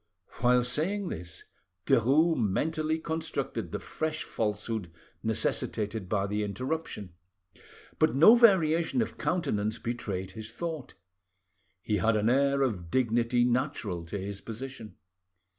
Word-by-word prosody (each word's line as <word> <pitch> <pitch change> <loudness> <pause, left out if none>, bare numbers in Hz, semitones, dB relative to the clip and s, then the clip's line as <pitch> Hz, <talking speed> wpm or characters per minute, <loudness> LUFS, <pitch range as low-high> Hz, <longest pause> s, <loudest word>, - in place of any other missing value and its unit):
While 125 0 +4
saying 180 +10 -1
this 85 0 -7 0.4
Derues 140 +7 +4
mentally 155 +9 0
constructed 160 0 -3
the - - -2
fresh 155 0 -3
falsehood 105 -3 -3 0.3
necessitated 105 -3 -1
by 100 -1 +1
the 105 +1 -1
interruption, 115 - -4 0.9
but 120 - +3
no 165 +11 +9
variation 190 -2 +4
of - - -8
countenance 110 - 0
betrayed 100 -6 -4
his 110 +3 -7
thought. 160 +1 -5 0.9
He 105 - 0
had 110 +4 +2
an 110 +2 +2
air 140 +1 +3
of 95 -10 -2
dignity 120 0 +2
natural 120 - -1
to 100 - -4
his 100 +1 -5
position. 115 -3 -8
120 Hz, 120 wpm, -29 LUFS, 105-155 Hz, 0.9 s, no